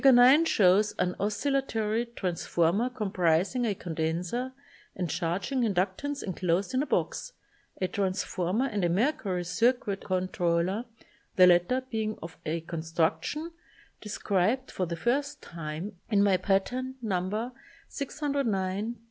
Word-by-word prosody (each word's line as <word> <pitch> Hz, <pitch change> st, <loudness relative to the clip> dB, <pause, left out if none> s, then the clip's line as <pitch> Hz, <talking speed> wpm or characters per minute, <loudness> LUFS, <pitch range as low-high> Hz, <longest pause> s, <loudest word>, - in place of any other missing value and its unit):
9 265 Hz, +4 st, +7 dB
shows 205 Hz, -, +4 dB
an 180 Hz, 0 st, 0 dB
oscillatory 225 Hz, 0 st, 0 dB
trans 185 Hz, -7 st, -3 dB
former 175 Hz, +9 st, +2 dB
comprising 195 Hz, 0 st, +1 dB
a 205 Hz, -, 0 dB
condenser 170 Hz, +9 st, -2 dB, 0.4 s
and 180 Hz, -3 st, -2 dB
charg 175 Hz, -, -2 dB
ing 265 Hz, -2 st, +1 dB
inductance 210 Hz, +7 st, -1 dB
enclosed 185 Hz, +2 st, -1 dB
in 255 Hz, -, +2 dB
a 300 Hz, -, -2 dB
box, -, -, -1 dB, 0.5 s
a 185 Hz, -, +1 dB
trans 190 Hz, 0 st, -1 dB
former 185 Hz, +8 st, 0 dB
and 210 Hz, -7 st, -1 dB
a 175 Hz, -, +3 dB
mercury 195 Hz, -, 0 dB
circuit 200 Hz, +3 st, +1 dB
controller, 185 Hz, +2 st, 0 dB, 0.5 s
the 185 Hz, -, +8 dB
latter 180 Hz, +8 st, +4 dB
being 215 Hz, -1 st, -1 dB
of 165 Hz, -1 st, -8 dB
a 165 Hz, +2 st, -1 dB
construction 165 Hz, -, -1 dB, 0.5 s
described 210 Hz, +4 st, 0 dB
for 185 Hz, -, -2 dB
the 170 Hz, -, -3 dB
first 280 Hz, -, 0 dB
time 165 Hz, +3 st, -6 dB, 0.2 s
in 205 Hz, -3 st, +4 dB
my 200 Hz, -2 st, +4 dB
patent 245 Hz, +8 st, 0 dB
No. 210 Hz, +4 st, -1 dB
195 Hz, 125 wpm, -29 LUFS, 175-245 Hz, 0.5 s, the